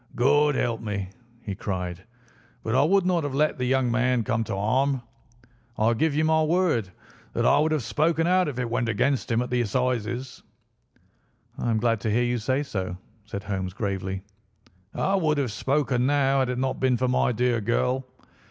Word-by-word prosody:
"God 145 Hz, +4 st, +3 dB
help 115 Hz, -3 st, -1 dB
me!" 100 Hz, -4 st, -4 dB, 0.3 s
he 100 Hz, -, -4 dB
cried. 95 Hz, -2 st, -4 dB, 0.6 s
"But 110 Hz, -, -2 dB
I 130 Hz, -, +4 dB
would 185 Hz, +5 st, +3 dB
not 180 Hz, -3 st, +1 dB
have 145 Hz, -2 st, -3 dB
let 150 Hz, -1 st, +1 dB
the 125 Hz, -, 0 dB
young 130 Hz, -1 st, +1 dB
man 125 Hz, 0 st, +2 dB
come 115 Hz, +1 st, 0 dB
to -, -, -3 dB
harm. 130 Hz, +6 st, +1 dB, 0.7 s
I 110 Hz, +2 st, +3 dB
give 150 Hz, +5 st, +1 dB
you 155 Hz, +1 st, +2 dB
my 160 Hz, 0 st, +3 dB
word 155 Hz, -, +1 dB, 0.4 s
that -, -, 0 dB
I -, -, +5 dB
would 155 Hz, +1 st, +2 dB
have 155 Hz, -5 st, 0 dB
spoken 160 Hz, +6 st, +1 dB
out 185 Hz, 0 st, +3 dB
if 140 Hz, -4 st, -4 dB
it 125 Hz, -1 st, -1 dB
went 120 Hz, -1 st, 0 dB
against 130 Hz, +5 st, 0 dB
him 115 Hz, +1 st, +2 dB
at 125 Hz, -, -7 dB
the 125 Hz, -1 st, +2 dB
Assizes." 120 Hz, +2 st, -2 dB, 1.1 s
"I -, -, -2 dB
am 115 Hz, -, +2 dB
glad 115 Hz, 0 st, +1 dB
to 110 Hz, -, -1 dB
hear 115 Hz, +4 st, +2 dB
you 120 Hz, 0 st, 0 dB
say 130 Hz, +6 st, 0 dB
so," 95 Hz, -9 st, -4 dB, 0.3 s
said 100 Hz, -2 st, -6 dB
Holmes 95 Hz, -2 st, -3 dB
gravely. 95 Hz, -2 st, -3 dB, 0.7 s
"I 195 Hz, -, 0 dB
would 160 Hz, -6 st, +2 dB
have 135 Hz, -5 st, 0 dB
spoken 130 Hz, +1 st, 0 dB
now 140 Hz, -1 st, +2 dB
had 130 Hz, -1 st, +1 dB
it 125 Hz, -, -2 dB
not 130 Hz, +1 st, -1 dB
been 130 Hz, -2 st, +2 dB
for 130 Hz, -, 0 dB
my 125 Hz, 0 st, +2 dB
dear 120 Hz, 0 st, +1 dB
girl. 125 Hz, +4 st, 0 dB
125 Hz, 195 wpm, -25 LUFS, 110-140 Hz, 1.1 s, I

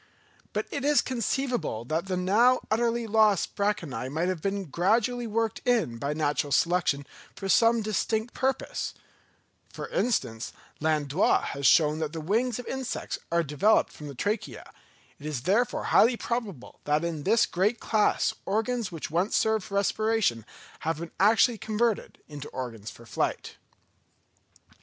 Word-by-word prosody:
But -, -, -2 dB
it 280 Hz, -, -3 dB
is 295 Hz, 0 st, +4 dB
conceivable 245 Hz, -, -1 dB
that 160 Hz, +7 st, -2 dB
the 185 Hz, -1 st, -1 dB
now 225 Hz, +8 st, +4 dB
utterly 235 Hz, +1 st, +1 dB
lost 215 Hz, -3 st, +2 dB
branchiæ 165 Hz, -, -2 dB
might 165 Hz, +5 st, 0 dB
have 185 Hz, -4 st, -3 dB
been 195 Hz, +1 st, -2 dB
gradually 225 Hz, -, +1 dB
worked 225 Hz, 0 st, -1 dB
in 215 Hz, -, +1 dB
by 140 Hz, +4 st, -2 dB
natural 145 Hz, -1 st, 0 dB
selection 165 Hz, -4 st, +2 dB, 0.3 s
for 195 Hz, -, -5 dB
some 230 Hz, +3 st, +4 dB
distinct 220 Hz, +2 st, -1 dB
purpose: 265 Hz, +1 st, -2 dB, 0.8 s
for -, -, -6 dB
instance, 135 Hz, -, -1 dB, 0.3 s
Landois 155 Hz, +1 st, +2 dB
has 140 Hz, -1 st, 0 dB
shown 155 Hz, -1 st, +4 dB
that 155 Hz, -1 st, -3 dB
the 165 Hz, -, -4 dB
wings 225 Hz, +9 st, 0 dB
of 245 Hz, -, -7 dB
insects 265 Hz, -2 st, -4 dB
are 170 Hz, 0 st, +2 dB
developed 150 Hz, +9 st, +2 dB
from 150 Hz, -, -9 dB
the 140 Hz, -, -8 dB
trachea; 205 Hz, -, -3 dB, 0.5 s
it 145 Hz, -, -11 dB
is 145 Hz, -5 st, -3 dB
therefore 230 Hz, -, +1 dB
highly 235 Hz, +2 st, +4 dB
probable 220 Hz, -, -4 dB
that 150 Hz, +2 st, +1 dB
in 165 Hz, -3 st, -3 dB
this 220 Hz, +9 st, +3 dB
great 205 Hz, +6 st, 0 dB
class 215 Hz, -2 st, +1 dB
organs 225 Hz, +1 st, -1 dB
which 165 Hz, -2 st, -6 dB
once 175 Hz, +5 st, +1 dB
served 220 Hz, -3 st, +1 dB
for 200 Hz, -, -7 dB
respiration 200 Hz, -, +1 dB, 0.3 s
have 160 Hz, 0 st, -2 dB
been 170 Hz, +1 st, -7 dB
actually 220 Hz, +3 st, +4 dB
converted 220 Hz, 0 st, -1 dB
into 145 Hz, -1 st, -8 dB
organs 115 Hz, -5 st, -6 dB
for 115 Hz, -, -13 dB
flight. -, -, -3 dB
200 Hz, 150 wpm, -27 LUFS, 155-230 Hz, 0.8 s, is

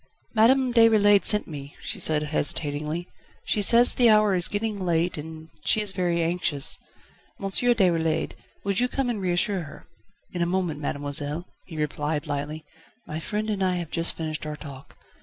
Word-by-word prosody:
"Madame 250 Hz, +3 st, +4 dB
Déroulède 215 Hz, -3 st, +5 dB
sent 210 Hz, -1 st, +1 dB
me," 145 Hz, -2 st, -9 dB
she -, -, -5 dB
said 150 Hz, -1 st, 0 dB
hesitatingly, 150 Hz, +2 st, -2 dB, 0.4 s
"she 210 Hz, -, 0 dB
says 235 Hz, +4 st, +5 dB
the 240 Hz, -2 st, +4 dB
hour 215 Hz, -2 st, +5 dB
is 175 Hz, -2 st, +1 dB
getting 210 Hz, 0 st, -2 dB
late 175 Hz, -1 st, 0 dB
and 160 Hz, +1 st, -8 dB
she -, -, +3 dB
is 210 Hz, -2 st, -1 dB
very 175 Hz, -3 st, 0 dB
anxious. 165 Hz, -3 st, 0 dB, 0.6 s
M. 195 Hz, -, -5 dB
Déroulède, 185 Hz, -7 st, +2 dB, 0.3 s
would 200 Hz, -1 st, 0 dB
you 250 Hz, -, +2 dB
come 255 Hz, -1 st, -1 dB
and 215 Hz, -4 st, -4 dB
reassure 185 Hz, +1 st, +1 dB
her?" 150 Hz, -3 st, -11 dB, 0.5 s
"In 175 Hz, -, -3 dB
a 170 Hz, -, +2 dB
moment, 175 Hz, -4 st, -1 dB
mademoiselle," 145 Hz, +2 st, -3 dB, 0.2 s
he 160 Hz, -, -9 dB
replied 150 Hz, 0 st, -2 dB
lightly, 150 Hz, +1 st, -4 dB, 0.4 s
"my 155 Hz, +1 st, -5 dB
friend 210 Hz, +6 st, -3 dB
and 200 Hz, -2 st, -2 dB
I 185 Hz, -1 st, +2 dB
have 170 Hz, -3 st, -4 dB
just 165 Hz, 0 st, 0 dB
finished 155 Hz, -1 st, -4 dB
our 150 Hz, -, -4 dB
talk. 140 Hz, -3 st, -11 dB
175 Hz, 170 wpm, -25 LUFS, 155-205 Hz, 0.6 s, Déroulède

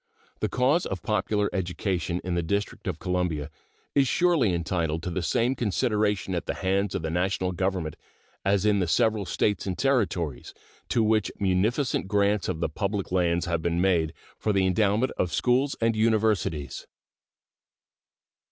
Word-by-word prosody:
The -, -, -1 dB
cause 135 Hz, +7 st, +2 dB
of 95 Hz, -3 st, -5 dB
popular 105 Hz, -1 st, 0 dB
education 90 Hz, -2 st, -2 dB
in 90 Hz, -, -2 dB
the 85 Hz, -, +1 dB
District 100 Hz, +5 st, -3 dB
of -, -, -2 dB
Columbia 85 Hz, -5 st, -2 dB, 0.4 s
is 140 Hz, -2 st, +3 dB
surely 165 Hz, -, +3 dB
entitled 85 Hz, -2 st, -1 dB
to 90 Hz, -, -3 dB
the 90 Hz, -, -2 dB
same 115 Hz, +9 st, +1 dB
consideration 105 Hz, -4 st, 0 dB
at 85 Hz, -, -3 dB
the -, -, -2 dB
hands 95 Hz, +1 st, 0 dB
of -, -, -2 dB
the 80 Hz, -, -2 dB
National 90 Hz, +1 st, 0 dB
Government 95 Hz, -4 st, -2 dB, 0.5 s
as 100 Hz, +1 st, +2 dB
in 105 Hz, -1 st, +3 dB
the 90 Hz, -, 0 dB
several 105 Hz, +3 st, +2 dB
States 105 Hz, -1 st, 0 dB
and 90 Hz, -2 st, -2 dB
Territories, 95 Hz, -, 0 dB, 0.3 s
to 115 Hz, -, +2 dB
which 110 Hz, -1 st, +2 dB
munificent 100 Hz, +6 st, +1 dB
grants 100 Hz, 0 st, +1 dB
of 80 Hz, -3 st, -3 dB
the -, -, +2 dB
public 100 Hz, +4 st, -3 dB
lands 85 Hz, -2 st, +1 dB
have 85 Hz, -1 st, -1 dB
been 85 Hz, +1 st, 0 dB
made 85 Hz, -4 st, +2 dB, 0.3 s
for 110 Hz, -, 0 dB
the 95 Hz, -2 st, +2 dB
endowment 105 Hz, +6 st, +2 dB
of 90 Hz, -, +1 dB
schools 130 Hz, +3 st, +2 dB
and 115 Hz, 0 st, +2 dB
universities. 110 Hz, -9 st, 0 dB
95 Hz, 160 wpm, -26 LUFS, 85-110 Hz, 0.5 s, is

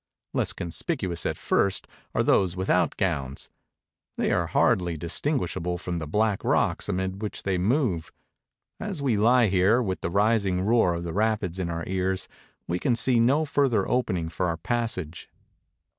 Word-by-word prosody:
Less -, -, 0 dB
conspicuous 85 Hz, -, -3 dB
at -, -, -2 dB
first 95 Hz, -1 st, +1 dB, 0.3 s
are -, -, +3 dB
those 95 Hz, -2 st, +3 dB
with 95 Hz, +1 st, -1 dB
out -, -, +2 dB
gowns 70 Hz, 0 st, -2 dB, 0.3 s
— -, -, -57 dB
they -, -, +1 dB
are -, -, +1 dB
hardly 90 Hz, -3 st, +2 dB
distinguishable 90 Hz, -, -2 dB
from 90 Hz, -1 st, -4 dB
the 80 Hz, -, -5 dB
black 105 Hz, +4 st, +1 dB
rocks -, -, +1 dB
amid 95 Hz, +2 st, -2 dB
which 105 Hz, -, -5 dB
they 95 Hz, -2 st, 0 dB
move. 100 Hz, -, 0 dB, 0.7 s
As 195 Hz, -6 st, -4 dB
we 135 Hz, -5 st, +1 dB
lie 120 Hz, +4 st, +4 dB
here, 95 Hz, +4 st, +3 dB
with 95 Hz, -7 st, -2 dB
the -, -, -2 dB
rising 100 Hz, -1 st, +2 dB
roar 105 Hz, -4 st, +3 dB
of 85 Hz, -, -4 dB
the 85 Hz, -2 st, -4 dB
rapids 105 Hz, -4 st, 0 dB
in 90 Hz, -2 st, -2 dB
our 85 Hz, 0 st, -3 dB
ears, 95 Hz, 0 st, -1 dB, 0.4 s
we 90 Hz, +1 st, -1 dB
can 120 Hz, +3 st, +1 dB
see 120 Hz, +1 st, +2 dB
no 135 Hz, +7 st, +3 dB
further 135 Hz, -8 st, +1 dB
opening 95 Hz, -10 st, 0 dB
for 90 Hz, +2 st, -2 dB
our 85 Hz, -1 st, -1 dB
passage. 95 Hz, -5 st, -3 dB
95 Hz, 170 wpm, -26 LUFS, 85-115 Hz, 0.7 s, lie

